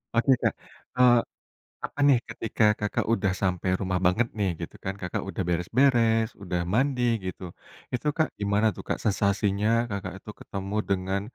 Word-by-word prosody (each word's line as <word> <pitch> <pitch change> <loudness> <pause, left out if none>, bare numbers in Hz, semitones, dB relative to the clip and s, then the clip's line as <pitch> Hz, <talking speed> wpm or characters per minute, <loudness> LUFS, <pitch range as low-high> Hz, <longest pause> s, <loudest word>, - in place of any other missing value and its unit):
Oke, 115 +3 +3
Kak, - - +2 0.4
eee, 125 -1 +6 0.7
apa - - -10
nih, 140 -3 +6
ketika 115 0 -2 0.2
Kakak 105 -1 -1
udah 100 -4 +1
sampai 95 -1 0
rumah 95 -2 -1
banget, 95 +7 +3
nih, 100 -2 +1
gitu - - -6
kan, 95 - -2
Kakak 90 -2 -3
udah - - -3
beres-beres, 115 +5 +3
udah 90 -2 -2
mandi, 130 +1 +1 0.2
gitu. 95 0 -5 0.5
Itu, 125 +4 -2
Kak, 160 - +2
gimana 100 +2 +2
tuh, - - -8
Kak, - - -1
sensasinya 100 0 +1 0.2
Kakak 100 -1 -4
itu 105 - -13
ketemu 100 +1 -5
dengan, 95 0 0
100 Hz, 160 wpm, -26 LUFS, 95-115 Hz, 0.7 s, eee